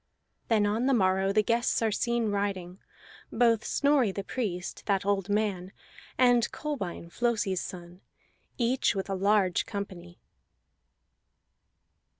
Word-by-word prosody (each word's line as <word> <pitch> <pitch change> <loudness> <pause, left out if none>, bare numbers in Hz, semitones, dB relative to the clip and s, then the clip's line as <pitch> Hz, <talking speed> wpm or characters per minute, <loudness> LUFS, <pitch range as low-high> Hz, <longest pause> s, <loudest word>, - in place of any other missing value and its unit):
Then 215 -3 +3
on 220 +5 0
the 270 - +4
morrow 190 -2 +2
the 210 +1 +3
guests 235 +2 +1
are 220 - +2
seen 235 0 0
riding, 195 -2 -3 0.5
both 230 -2 +3
Snorri 280 -7 +2
the 200 +1 -5
Priest, 190 -6 -4
that 195 -2 +1
old 200 -1 0
man, 200 -3 -1 0.5
and 245 -2 +4
Kolbein 195 - -5
Flosi's 215 -6 0
son, 175 0 -9 0.6
each 245 -2 +1
with 195 0 -3
a - - 0
large 195 -1 +2
company. 185 -4 -7
205 Hz, 125 wpm, -28 LUFS, 190-235 Hz, 0.6 s, the